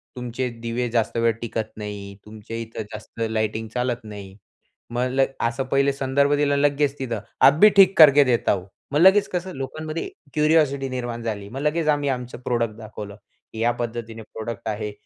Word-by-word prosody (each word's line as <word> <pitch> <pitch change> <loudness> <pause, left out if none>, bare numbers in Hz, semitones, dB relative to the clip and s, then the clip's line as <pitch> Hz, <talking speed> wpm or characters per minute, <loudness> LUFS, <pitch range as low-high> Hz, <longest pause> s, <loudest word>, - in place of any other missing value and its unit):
तुमचे 125 +1 -3
दिवे 120 +1 -2
जास्त 115 -1 0
वेळ 115 0 +3
टिकत 110 -2 -4
नाही, 100 -1 -7
तुमच्या 110 +1 -8
इथं 115 -1 -6
जास्त 105 +2 -10
लाईटिंग 110 0 -2
चालत 125 -1 -2
नाही. 100 -3 -10 0.5
मग 120 +2 -1
ल 135 +1 +3 0.2
असं 120 +3 0
पहिले 140 0 +3
संदर्भ 140 +1 +1
दिला 145 -1 +2
लगेच 145 0 +1
तिथं, 120 -4 -3 0.2
"अभी 155 +10 +7
ठीक 195 -1 +7
करके 145 -2 +8
देता 125 -3 +2
हूँ." 95 -1 -5 0.2
मग 145 - +1
लगेच 190 +3 +6
कसं 180 0 -4
लोकांमध्ये 155 +4 -5 0.2
क्युरिओसिटी 150 -3 +2
निर्माण 120 -2 -4
झाली. 105 -3 -4
मग 135 +4 -6
लगेच 155 +2 0
आम्ही 145 -1 +1
आमचं 125 -2 -4
प्रॉडक्ट 115 -3 -1
दाखवलं. 105 -2 -8 0.4
की 110 - -7
या 120 +1 +3
पद्धतीने 115 -1 -5
प्रॉडक्ट 110 0 -6
आहे. 105 0 -3
120 Hz, 170 wpm, -23 LUFS, 110-140 Hz, 0.5 s, करके